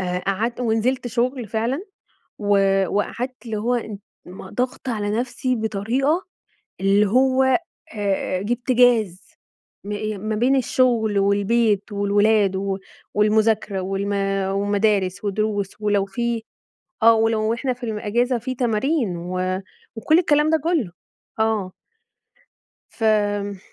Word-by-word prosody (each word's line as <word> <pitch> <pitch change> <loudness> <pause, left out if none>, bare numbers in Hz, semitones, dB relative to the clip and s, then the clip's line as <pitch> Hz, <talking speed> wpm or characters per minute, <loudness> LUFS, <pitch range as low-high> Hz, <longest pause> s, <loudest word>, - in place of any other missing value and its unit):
آآ 180 -1 -1
قعدت 220 +6 -1
ونزلت 240 +2 0
شغل 245 +1 -1
فعلًا 230 - -1 0.6
و 195 -2 +3
وقعدت 245 +6 -2
اللي 220 -2 -3
هو 235 +4 0
إن 220 -4 -5 0.3
ما 180 +2 -10
ضاغطة 250 +1 -3
على 210 -2 -2
نفسي 250 +1 -2
بطريقة 235 - 0 0.6
اللي 200 +2 +3
هو 260 +4 +3
أ 260 -1 +4 0.8
أ - - -4
جِبت 240 +4 -1
جاز. 230 -7 +3 0.5
م 205 - -5
آآ 210 0 -3
ما 215 +2 -3
بين 255 +5 +3
الشغل 235 -5 +2
والبيت 205 +1 +1
والولاد 205 0 +2
و 195 0 -2 0.4
والمذاكرة 215 -1 +2
والم 195 +2 -2 0.4
ومدارس 200 -1 0
ودروس 205 -1 -1
ولو 205 -2 +1
فيه 235 +2 -2 0.6
آه. 230 0 +8
ولو 225 0 +1
إحنا 255 +2 -1
في 245 0 -16
الم 220 -3 -3
أجازة 240 +4 0
في 255 +3 -4
تمارين 235 - 0
و 185 +2 -2 0.3
وكل 310 +9 +3
الكلام 300 -3 +3
ده 320 - +4
كُلّه. 320 - 0 0.5
آه. 220 -4 0 1.2
فم 205 -3 0
220 Hz, 125 wpm, -22 LUFS, 200-245 Hz, 1.2 s, آه